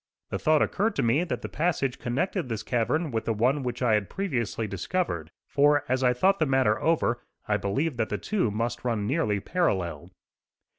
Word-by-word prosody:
The - - -2
thought 155 -1 +4
occurred 220 +4 0
to - - +1
me 120 +8 +3
that - - -4
the - - -2
passage 145 -6 -1
connected 140 +5 -1
this 110 -2 -3
cavern 130 +7 0
with 110 -1 -2
the 115 - 0
one 130 +7 +2
which 125 0 -3
I 115 -3 +3
had 105 -2 +1
previously 125 - -2
discovered; 100 - -2 0.2
for, 145 +1 +3
as 130 +1 0
I 125 - +5
thought 190 +11 +2
the 155 - +2
matter 130 -5 +2
over, 135 -7 +1 0.3
I 105 - +2
believed 120 +9 -1
that 110 -2 0
the 105 - -1
two 180 - 0
must 115 +3 -2
run 115 -4 -1
nearly 110 -5 +1
parallel. 90 - -1
125 Hz, 195 wpm, -27 LUFS, 110-155 Hz, 0.3 s, I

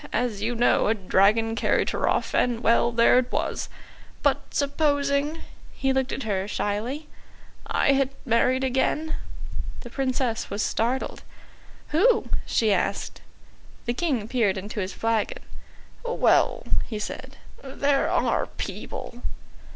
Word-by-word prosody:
As 230 -4 -1
you 235 +3 -1
know, 240 -2 +3
a 220 - +3
dragon 210 +3 +3
carried 225 - +1
her - - 0
off - - 0
and 240 -2 +1
well, 235 0 +3
there 235 +2 +5
it 250 - -3
was. - - -2 0.5
But - - +3
supposing" 285 +1 +1 0.3
he 270 0 +1
looked 265 0 0
at 270 - -3
her 195 -3 -1
shyly 225 +9 -2 0.6
"I - - +3
had 275 -1 +2 0.2
married 255 +2 +2
again." 265 +4 0 0.6
The 240 - -10
Princess 255 -3 -1
was 205 +1 -1
startled. 245 +4 -1 0.7
"Who?" 435 +8 +3 0.2
she 220 -3 +3
asked. 185 - -2 0.6
The 240 - 0
King 255 -7 -1
peered 220 -6 +1
into 205 +3 -5
his 190 -1 -2
flagon. 230 - -1 0.6
"Well," 485 0 +2 0.2
he 220 - -4
said, 260 +5 -6 0.3
"there 275 +1 +1
are - - +1
people." 240 0 -7
245 Hz, 130 wpm, -25 LUFS, 220-275 Hz, 0.7 s, there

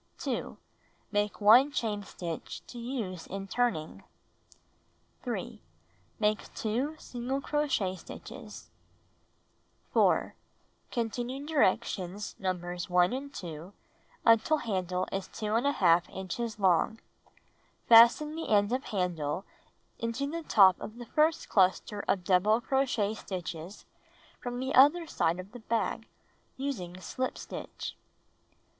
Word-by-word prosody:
Make 205 0 0
1 235 +7 +7
chain 215 -6 -1
stitch 175 -4 -7
to 240 - -9
use 230 -8 -4
in 195 +1 -5
turning. 185 - -1 1.2
3. - - -5 0.6
Make 215 0 0
2 250 +8 -1
single 250 +1 -4
crochet 275 -11 0
stitches. - - -10 1.2
4. - - +3 0.6
Continue 245 +3 -3
directions 205 - 0
Nos. 180 -2 -3
1 180 +3 +4
and 275 +2 -5
2 170 - -8 0.5
until 230 +7 +5
handle 185 - -2
is 195 -1 -3
2^ 215 -6 +2
inches 210 +4 -4
long. 195 +3 +2 0.9
Fasten 235 +7 +7
the 325 - -5
end 205 0 +3
of 260 +2 -1
handle 180 -3 -2 0.5
into 230 +4 -2
the 330 +4 -4
top 190 - +5
of 215 - -7
the 240 - -8
fii'st 310 +5 +1
cluster 195 +1 +2
of 185 -2 +1
double 195 +5 +3
crochet 240 -4 0
stitches 180 -2 -6 0.5
from 245 0 -4
the 265 +2 -2
other 295 +6 +6
side 170 - 0
of 185 +2 -8
the 245 - -9
bag, 225 0 -2 0.5
using 190 -11 -4
slip 255 +9 -3
stitch. - - -7
215 Hz, 110 wpm, -30 LUFS, 185-250 Hz, 1.2 s, 1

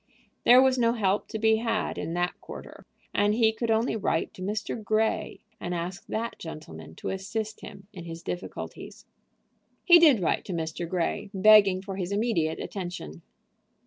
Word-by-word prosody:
There 250 +2 +8
was 260 -1 +2
no 230 -1 +3
help 205 -3 0
to 220 - -5
be 220 0 +3
had 230 0 -2
in 165 - -4
that 175 0 0
quarter, - - -11 0.3
and 205 +1 +2
he 220 -1 +3
could 230 +1 -3
only 225 +1 +1
write 175 -6 -1
to - - -12
Mr. 215 +3 -3
Grey, 215 0 0 0.2
and 175 0 -3
ask 175 +3 -5
that 230 +2 -4
gentleman 80 - -9
to - - -5
assist 210 +3 -4
him 195 - -11
in 175 -4 -9
his 165 0 -8
difficulties. 175 +2 -7 0.8
He 345 -1 +9
did 300 -9 +6
write 175 - 0
to 185 - -5
Mr. 165 0 -4
Grey, 180 +2 -2
begging 195 -1 +6
for 195 -1 -6
his 185 0 -3
immediate 200 -7 0
attention. 175 - -6
200 Hz, 170 wpm, -27 LUFS, 175-220 Hz, 0.8 s, He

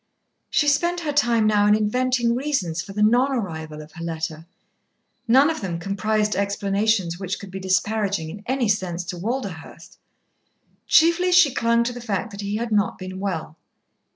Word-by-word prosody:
She 295 - +2
spent 345 +5 +1
her 305 -3 -2
time 240 -6 +2
now 205 -1 +3
in 210 - +5
inventing 240 +2 +1
reasons 240 - -1
for 195 - -10
the 210 +1 0
non 245 +5 +4
arrival 160 - -4
of 150 - -16
her 170 - -9
letter. 160 -1 -5 0.8
None 265 +5 +6
of 315 - -5
them 180 -4 -3
comprised 210 +3 -1
explanations 200 -2 0
which 190 -1 -4
could 200 -2 -10
be 190 - -6
disparaging 190 -2 0
in 205 +4 -10
any 260 -2 0
sense 185 -4 -1
to 180 - -6
Walderhurst. 200 -6 -6 0.9
Chiefly 340 +3 +4
she 350 -7 +5
clung 235 -1 +2
to 245 +1 -3
the 245 - -8
fact 225 -1 -3
that 200 0 -7
he 200 +1 -3
had 230 +1 -3
not 210 -1 +1
been 185 0 -7
well. 175 -5 -4
210 Hz, 175 wpm, -23 LUFS, 185-240 Hz, 0.9 s, None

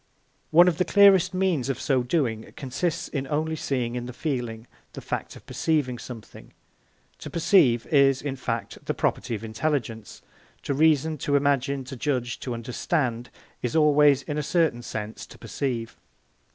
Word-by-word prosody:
One 175 +3 +7
of 175 -2 +1
the - - +4
clearest 200 -2 +5
means 185 -9 0
of 135 - -2
so 135 -3 +1
doing 120 -5 -1
consists 150 +6 -2
in 135 -2 -4
only 155 +2 -1
seeing 125 -6 -2
in 120 0 -4
the 125 - -7
feeling 120 -6 -3 0.3
the - - -7
fact - - -5
of - - -14
perceiving 145 -7 -1
something. 115 -4 -11 0.7
To - - -7
perceive 155 - +3
is, 140 -3 +4
in 135 -1 -4
fact, 115 -5 -4
the - - -2
property 120 - -1
of 105 - -7
intelligence; 115 -2 -3 0.4
to 140 - -1
reason, 155 +1 +2
to 145 +1 0
imagine, 140 -1 +1
to 130 +1 -8
judge, 125 -2 -2
to 125 -3 -4
understand, 120 +1 -2 0.3
is 125 - -2
always, 150 -3 +5
in 150 0 -3
a - - 0
certain 155 -5 +1
sense, 110 -2 -6
to - - -14
perceive. 120 -5 -4
135 Hz, 165 wpm, -25 LUFS, 120-155 Hz, 0.7 s, One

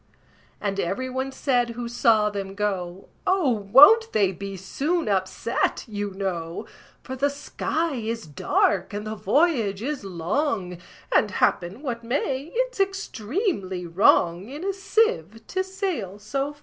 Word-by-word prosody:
And 200 -1 -2
every 255 +9 -2
one 260 +1 -2
said 250 -3 +1
who 240 -1 -3
saw 225 -3 +3
them 195 -1 -5
go, 190 -3 -3 0.2
"Oh! 370 -8 +3
won't 270 - +7
they 200 -3 +3
be 195 +1 -7
soon 300 - -1
upset, 190 +3 0
you 205 -2 -3
know? 175 -4 -3 0.4
For 260 - -6
the 280 +2 +1
sky 310 +3 -2
is 230 -2 -3
dark, 185 +5 +1
and 210 +1 -4
the 215 - -3
voyage 220 - +1
is 290 -1 -3
long; 185 - -2 0.3
And, 210 - +4
happen 190 - 0
what 235 -4 -4
may, 270 +4 -2
it's - - -1
extremely 275 - -2
wrong 175 +1 +3
In 295 +5 -7
a 395 - 0
sieve 380 - 0
to 375 0 -1
sail 370 - -3
so 275 +8 -3
fast." 290 - -23
225 Hz, 145 wpm, -25 LUFS, 195-290 Hz, 0.4 s, won't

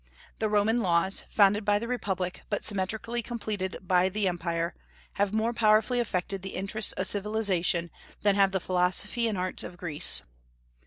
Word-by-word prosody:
The 220 - 0
Roman 210 +3 +2
laws 185 0 +1
founded 205 0 +4
by 205 0 +3
the 230 +3 -4
Republic, 190 -7 -3
but 205 - -2
symmetrically 220 +4 0
completed 210 -5 -4
by 185 0 +3
the 205 +1 0
Empire 170 -1 -2 0.5
have 200 -1 +2
more 220 +2 0
powerfully 220 +2 +3
affected 195 -4 -2
the 190 0 -7
interests 200 +2 0
of 190 - -2
civilization 190 -5 0 0.3
than 205 -1 +4
have 195 -1 +4
the 190 0 -1
philosophy 185 +6 +1
and 215 -3 -2
arts 185 0 -2
of 175 - -9
Greece. 155 -4 +2
200 Hz, 160 wpm, -28 LUFS, 185-215 Hz, 0.5 s, founded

